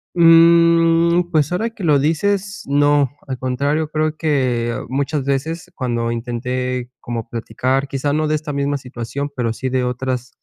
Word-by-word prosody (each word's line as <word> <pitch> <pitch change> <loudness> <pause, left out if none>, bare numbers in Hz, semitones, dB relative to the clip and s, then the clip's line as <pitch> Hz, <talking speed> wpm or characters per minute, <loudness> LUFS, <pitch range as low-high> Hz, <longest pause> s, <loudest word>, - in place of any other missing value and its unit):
Mm, 170 0 +5
pues 155 0 +1
ahora 220 +6 0
que 220 -5 -7
lo 150 -3 +4
dices, 195 +7 0
no. 145 -1 +3 0.2
Al 130 -1 -4
contrario, 140 +4 -1
creo 155 0 -1
que, 125 -7 0
muchas 140 +2 -1
veces, 160 +6 -3
cuando 120 -3 -2
intenté 125 +1 -3
como 115 -1 -5
platicar, 130 +4 -1
quizá 135 +1 -2
no 155 +1 0
de 155 - +1
esta 155 0 -4
misma 140 0 -1
situación, 130 +2 -5
pero 115 -3 -1
sí 130 +3 -4
de 130 0 0
otras, 125 0 -3
140 Hz, 155 wpm, -19 LUFS, 125-160 Hz, 0.2 s, Mm